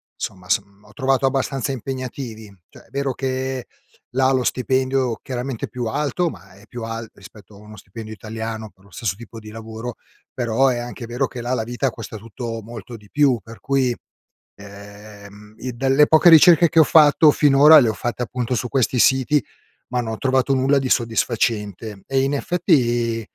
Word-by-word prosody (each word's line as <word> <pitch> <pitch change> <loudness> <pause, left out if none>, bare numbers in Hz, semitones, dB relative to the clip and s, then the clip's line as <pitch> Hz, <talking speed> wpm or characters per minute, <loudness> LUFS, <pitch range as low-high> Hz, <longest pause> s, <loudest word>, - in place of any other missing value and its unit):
somma 90 -1 -7
s - - +3 0.2
ho 105 - -19
trovato 135 +4 +1
abbastanza 135 0 -1
impegnativi. 125 -4 -6
Cioè - - -16
è - - -26
vero 140 0 -2
che 130 -1 -3 0.5
là 130 0 +3
lo 130 -1 +1
stipendio, 130 -1 0
chiaramente, 125 -1 -4
è - - -24
più 125 -1 -5
alto 150 +8 -1
ma 100 - -13
è 100 +2 -18
più 120 +1 -8
al 115 0 -5
rispetto 105 -1 -16
a - - -14
uno 105 +1 -13
stipendio 110 +3 -9
italiano 110 0 -6
per 95 - -28
lo 100 - -21
stesso 105 -4 -3
tipo 115 +1 -11
di 110 -1 -12
lavoro, 115 +2 -7 0.4
però 120 +1 +1
è 125 -2 +1
anche 120 0 -7
vero 125 +3 -1
che 125 - -8
là 120 +2 -2
la 120 - -1
vita 120 +4 -2
costa 115 -1 -8
tutto 115 +1 -7
molto 115 +1 -9
di 105 -1 -19
più 140 -3 +2
per 115 +4 -13
cui, 135 -3 +1 0.6
ehm, 100 +1 -13
i 125 +2 -5
dalle 135 +3 +4
poche 160 +3 +5
ricerche 165 +1 +7
che 165 - 0
ho 160 - +8
fatto 150 0 +6
finora 145 +2 +7
le 120 - +2
ho 110 - -1
fatte, 120 +5 -4
appunto, 125 0 -3
su 125 +1 -2
questi 130 0 0
siti, 130 +1 +3 0.4
ma 125 0 -1
non 115 -2 -4
ho 110 - -5
trovato 130 0 +1
nulla 135 +2 +2
di 135 -1 -2
soddisfacente 110 -4 -1
e, 135 -1 +1
in 135 +1 0
effetti, 120 - +1
120 Hz, 190 wpm, -21 LUFS, 110-135 Hz, 0.6 s, ho